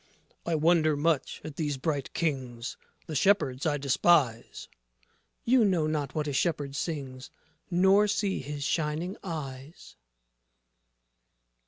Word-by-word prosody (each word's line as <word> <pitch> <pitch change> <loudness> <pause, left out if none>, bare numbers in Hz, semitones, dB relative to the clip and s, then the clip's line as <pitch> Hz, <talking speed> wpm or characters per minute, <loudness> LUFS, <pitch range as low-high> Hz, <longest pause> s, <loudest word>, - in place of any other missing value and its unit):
JOSEPH - - -35
I 170 - +1
wonder 155 -1 +3
much 155 -1 0
at 155 -2 -8
these 150 -4 -1
bright 145 -1 -2
Kings; 130 -7 -2 0.3
The 160 - -7
shepherds 145 -5 +2
I 145 -1 +1
despise. 135 -3 +2
MARY - - -41 0.7
You 250 0 +4
know 180 -6 +2
not 150 -2 -2
what 155 -1 -1
a 145 - -2
shepherd 145 -1 -1
sings, 135 -5 -5 0.4
Nor 190 +3 +4
see 200 -1 0
his 145 +1 -5
shining 160 +5 -1
eyes. 145 -4 -7
150 Hz, 130 wpm, -28 LUFS, 140-170 Hz, 0.7 s, You